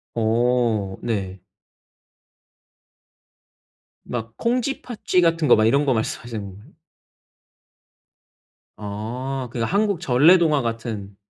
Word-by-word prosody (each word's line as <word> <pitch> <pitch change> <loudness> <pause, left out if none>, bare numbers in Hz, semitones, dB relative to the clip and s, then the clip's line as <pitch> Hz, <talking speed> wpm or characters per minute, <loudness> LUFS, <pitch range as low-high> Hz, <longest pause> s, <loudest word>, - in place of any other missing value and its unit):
어 115 -3 +1
네. 95 -5 -3 2.6
막 115 -2 -5
콩쥐, 250 +3 -1
팥쥐 210 -6 0
같은 165 -2 +2
거 - - +7
막 110 - +3
이런 140 +6 +3
거 135 - +2
말씀하시는 110 - -5 2.0
아 120 +6 -5
그 120 - -5
한국 200 - +1
전래동화 155 +2 +4
같은 115 -4 -5
120 Hz, 155 characters per minute, -22 LUFS, 110-155 Hz, 2.6 s, 거